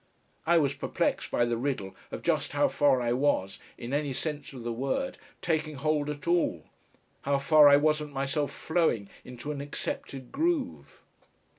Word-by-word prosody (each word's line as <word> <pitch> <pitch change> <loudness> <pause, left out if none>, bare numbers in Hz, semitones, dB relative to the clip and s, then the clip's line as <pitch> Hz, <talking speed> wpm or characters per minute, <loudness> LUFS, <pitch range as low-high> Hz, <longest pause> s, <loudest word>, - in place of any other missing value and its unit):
I 170 0 +5
was 140 -4 +2
perplexed - - -1
by 120 - +2
the 120 -1 -1
riddle 120 -7 -3
of - - -7
just - - 0
how - - +3
far 140 -3 +3
I 120 0 +1
was, 125 -8 0 0.2
in 120 +3 -6
any 145 -1 0
sense 145 +1 -3
of 130 -4 -9
the 120 0 -2
word, 135 - -2 0.2
taking 155 -3 0
hold 150 +1 0
at 150 +2 -6
all, 170 - +1 0.6
how 140 0 +1
far 150 +2 +6
I 140 - +8
wasn't 150 0 +1
myself 140 +2 -1
flowing 160 - 0
into 125 +4 -7
an 145 -2 -4
accepted 135 -2 -5
groove. 320 -3 -2
145 Hz, 165 wpm, -29 LUFS, 130-155 Hz, 0.6 s, I